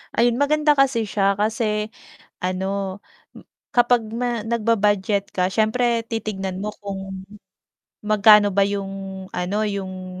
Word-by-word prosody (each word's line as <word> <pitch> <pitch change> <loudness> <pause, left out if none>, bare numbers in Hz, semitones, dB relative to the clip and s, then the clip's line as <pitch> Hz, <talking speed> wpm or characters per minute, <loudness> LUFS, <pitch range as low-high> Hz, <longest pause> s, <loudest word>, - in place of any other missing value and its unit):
Ayun. 240 +2 +2
Maganda 300 +1 +3
kasi 260 -4 +3
siya 200 -1 +1
kasi 215 0 -1 0.5
ano, 190 +1 -2 0.8
kapag 245 -1 +4
ma 240 -1 -2
nagba-budget 210 -3 +1
ka 180 -1 +1
siyempre 230 +2 +1
titignan 195 -5 -4
mo 210 0 -3
kung 195 -1 -6 0.8
magkano 210 0 +6
ba 200 +1 +3
yung 195 -1 -5
ano, 195 +4 -1
yung 185 -2 -5
205 Hz, 110 wpm, -22 LUFS, 195-230 Hz, 0.8 s, magkano